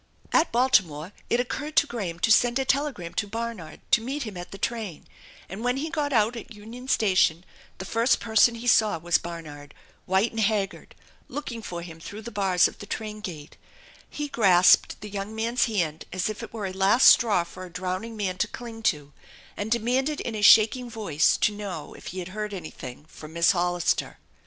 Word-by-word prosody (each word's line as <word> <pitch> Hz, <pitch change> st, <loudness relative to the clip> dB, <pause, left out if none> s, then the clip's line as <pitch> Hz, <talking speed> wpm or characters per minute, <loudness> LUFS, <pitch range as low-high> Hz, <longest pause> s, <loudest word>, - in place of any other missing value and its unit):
At 330 Hz, -, +3 dB
Baltimore 190 Hz, -, +2 dB, 0.2 s
it 235 Hz, -, +2 dB
occurred 290 Hz, +5 st, -3 dB
to 285 Hz, -, +5 dB
Graham 200 Hz, -11 st, -5 dB
to 225 Hz, -, +3 dB
send 240 Hz, +2 st, +4 dB
a 270 Hz, -, 0 dB
telegram 265 Hz, -, -1 dB
to 205 Hz, -, -2 dB
Barnard 225 Hz, -7 st, -6 dB
to 220 Hz, -, +5 dB
meet 270 Hz, +5 st, -3 dB
him 215 Hz, -4 st, -7 dB
at 175 Hz, 0 st, -7 dB
the 195 Hz, -, -9 dB
train, 215 Hz, -7 st, -4 dB, 0.4 s
and 195 Hz, +5 st, -7 dB
when 245 Hz, +1 st, +1 dB
he 310 Hz, +3 st, -3 dB
got 295 Hz, -3 st, -1 dB
out 225 Hz, -1 st, +2 dB
at 230 Hz, -1 st, -9 dB
Union 230 Hz, +5 st, -10 dB
Station 185 Hz, -7 st, +2 dB, 0.3 s
the 190 Hz, -, -7 dB
first 230 Hz, +5 st, +2 dB
person 225 Hz, +1 st, +3 dB
he 230 Hz, +1 st, -8 dB
saw 215 Hz, -6 st, +4 dB
was 175 Hz, +2 st, +1 dB
Barnard, 155 Hz, -4 st, -9 dB, 0.3 s
white 190 Hz, +5 st, +2 dB
and 225 Hz, -, -5 dB
haggard, 205 Hz, -2 st, -1 dB, 0.3 s
looking 260 Hz, -6 st, -6 dB
for 175 Hz, -5 st, -6 dB
him 165 Hz, -1 st, -10 dB
through 205 Hz, +6 st, -9 dB
the 235 Hz, -, -7 dB
bars 190 Hz, -4 st, +3 dB
of -, -, -12 dB
the 205 Hz, -, -9 dB
train 215 Hz, 0 st, -5 dB
gate, 155 Hz, -7 st, -8 dB, 0.5 s
He 295 Hz, 0 st, -4 dB
grasped 185 Hz, -9 st, +4 dB
the 210 Hz, -, -7 dB
young 200 Hz, +2 st, -5 dB
man's 230 Hz, +3 st, +1 dB
hand 165 Hz, -9 st, -2 dB
as 185 Hz, +3 st, -1 dB
if 215 Hz, -, -8 dB
it -, -, -8 dB
were 220 Hz, -3 st, -5 dB
a 190 Hz, -, -4 dB
last 195 Hz, +6 st, +4 dB
straw 210 Hz, -7 st, +6 dB
for 185 Hz, +2 st, -11 dB
a 185 Hz, -, -9 dB
drowning 185 Hz, +6 st, -4 dB
man 185 Hz, -3 st, -2 dB
to -, -, +1 dB
cling 230 Hz, -2 st, -9 dB
to, 145 Hz, -1 st, -6 dB, 0.4 s
and 205 Hz, +1 st, -4 dB
demanded 255 Hz, +6 st, 0 dB
in 235 Hz, -, -4 dB
a 215 Hz, -, -4 dB
shaking 225 Hz, +4 st, +6 dB
voice 185 Hz, -, +1 dB
to 210 Hz, -, +2 dB
know 195 Hz, -7 st, -6 dB
if -, -, -12 dB
he 185 Hz, -, -7 dB
had 180 Hz, -1 st, -5 dB
heard 210 Hz, +1 st, -5 dB
anything 150 Hz, -6 st, -9 dB
from 155 Hz, 0 st, -12 dB
Miss 170 Hz, 0 st, +4 dB
Hollister. 175 Hz, -1 st, 0 dB
210 Hz, 200 wpm, -26 LUFS, 180-235 Hz, 0.5 s, straw